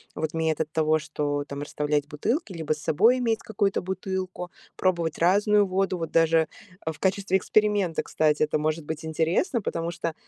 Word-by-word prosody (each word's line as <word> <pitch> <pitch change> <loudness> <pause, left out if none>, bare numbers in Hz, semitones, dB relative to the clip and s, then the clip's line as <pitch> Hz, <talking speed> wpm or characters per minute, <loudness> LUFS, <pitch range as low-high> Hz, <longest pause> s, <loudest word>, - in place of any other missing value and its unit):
вот 155 0 -3
метод 160 -1 0
того, 155 0 +2
что 145 -2 -2
там 140 0 -6
расставлять 150 0 -1
бутылки, 215 - -2
либо 160 -3 -1
с 155 - -9
собой 220 +13 +3
иметь 230 -3 +1
какую-то 200 -2 -1
бутылку, 185 -1 -4 0.2
пробовать 170 -4 0
разную 205 +4 +4
воду. 190 0 0
Вот 165 -2 -4
даже 165 -1 +3 0.4
в 160 -2 -4
качестве 190 0 +1
эксперимента, 205 -4 +1
кстати, 155 -1 +1
это 155 0 +1
может 155 +1 -1
быть 160 +1 -5
интересно, 165 - 0
потому 165 -2 -2
что, 165 -1 -3
165 Hz, 165 wpm, -26 LUFS, 155-190 Hz, 0.4 s, разную